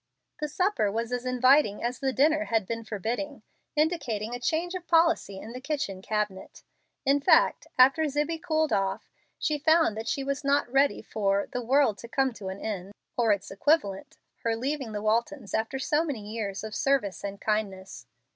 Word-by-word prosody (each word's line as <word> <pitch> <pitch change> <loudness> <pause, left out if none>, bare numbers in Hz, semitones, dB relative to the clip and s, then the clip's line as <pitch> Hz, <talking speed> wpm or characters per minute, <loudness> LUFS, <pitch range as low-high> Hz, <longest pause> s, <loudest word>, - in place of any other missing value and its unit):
The 300 - -1
supper 330 - +1
was 230 +3 -2
as 245 0 -2
inviting 255 -3 +4
as 240 +1 -2
the 270 -1 0
dinner 310 +4 +3
had 225 -3 0
been 230 +3 -4
forbidding, 230 +6 -4 0.3
indicating 255 -9 0
a 245 - -4
change 330 +7 -1
of 360 -2 -6
policy 330 - +3
in 220 +4 -8
the 255 - -7
kitchen 255 -10 -3
cabinet. 210 -2 -3 0.4
In 280 +1 +3
fact, - - +4
after 275 +5 +6
Zibbie 295 +3 -1
cooled 315 -3 +1
off, 195 -1 -1 0.3
she 300 -1 -1
found 320 -5 +4
that 220 +1 -5
she 275 - -1
was 275 +1 -2
not 280 +1 +2
ready 275 +2 +2
for 200 -2 0
"the 250 - -2
world 250 -3 +2
to 235 - -9
come 265 +1 +1
to 205 -4 -8
an 190 +1 -5
end" 200 -2 -5 0.2
(or 235 -3 +3
its 200 -2 -1
equivalent, 200 -3 0 0.2
her 230 -1 -1
leaving 265 0 -3
the 210 -1 -4
Waltons 230 +2 -1
after 225 +4 -1
so 300 +4 +1
many 225 -10 -5
years 210 -3 -4
of 220 -1 -6
service 260 -6 0
and 200 0 -5
kindness). 195 - -3
245 Hz, 185 wpm, -27 LUFS, 210-290 Hz, 0.4 s, after